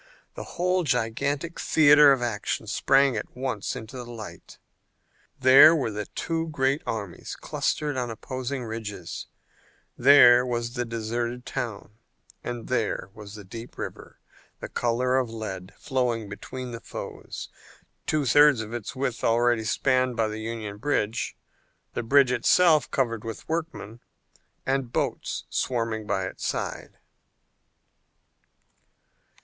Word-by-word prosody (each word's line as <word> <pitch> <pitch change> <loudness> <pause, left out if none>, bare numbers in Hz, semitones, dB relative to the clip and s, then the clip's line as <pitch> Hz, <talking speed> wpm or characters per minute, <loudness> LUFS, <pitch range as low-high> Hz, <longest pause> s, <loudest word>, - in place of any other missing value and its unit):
The - - -7
whole 180 +1 +2
gigantic 140 +5 -1
theater 150 -1 +6
of 130 -3 +2
action 110 -1 -2
sprang 135 +4 +3
at 110 - -6
once 125 -7 -3
into 115 +4 -8
the 120 -1 -7
light. 110 -3 -10 0.8
There 135 +5 +8
were 135 -8 -1
the 105 -1 -5
two 165 0 -3
great 140 -1 0
armies 100 -6 -5
clustered 150 -2 -1
on 125 -1 -2
opposing 130 +3 -4
ridges, 110 -6 -6 0.7
there 125 -2 +7
was 120 -1 -2
the 125 -1 -2
deserted 115 +2 -3
town, 115 -4 -5 0.4
there 120 -4 -2
was 105 -1 -10
the 105 - -9
deep 115 +5 -10
river, - - -7 0.4
the - - -7
color 125 +2 +1
of 125 -3 -2
lead, 100 -4 -6
flowing 120 -4 -1
between 125 +5 -7
the 115 - -6
foes, - - -7 0.6
two 150 -2 +1
thirds 145 -1 +6
of 110 +1 -7
its 120 +1 -5
width 130 -2 -2
already 120 0 +3
spanned 130 +3 +1
by 115 -1 +2
the 105 +1 -5
Union 110 -2 -5
bridge, 115 -2 -1 0.6
the - - -2
bridge 135 +2 +4
itself 155 +1 +4
covered 115 -5 -1
with 115 -1 -7
workmen, 160 -9 -4 0.7
and 135 -2 -1
boats - - -2
swarming 115 -3 -1
by 95 -2 0
its 95 - -7
side. - - -4
120 Hz, 130 wpm, -26 LUFS, 110-135 Hz, 0.8 s, There